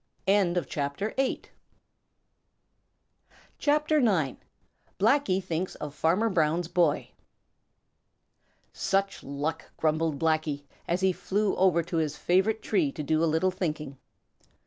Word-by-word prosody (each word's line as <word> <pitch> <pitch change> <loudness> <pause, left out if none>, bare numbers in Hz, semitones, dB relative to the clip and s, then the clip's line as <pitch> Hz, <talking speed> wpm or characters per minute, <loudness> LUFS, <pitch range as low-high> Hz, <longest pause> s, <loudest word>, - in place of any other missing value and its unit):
CHAPTER 180 -2 0
IX: 270 0 -1 2.1
Blacky 235 - 0
Thinks 180 +1 -3
Of 150 -1 -6
Farmer 175 +9 +2
Brown's 165 0 +1
Boy 170 -3 +1 1.6
"Such 195 0 0
luck!" 145 +4 -4
grumbled 155 -1 +1
Blacky, 155 -2 0 0.2
as 175 +2 0
he 190 0 +4
flew 205 +3 0
over 180 -3 +3
to 170 +1 -3
his 150 -2 -1
favorite 190 +5 +1
tree 305 -6 +1
to 150 - -5
do 155 +2 +1
a 165 - +3
little 160 +4 +2
thinking. 155 -7 -4
175 Hz, 100 wpm, -28 LUFS, 155-195 Hz, 2.1 s, he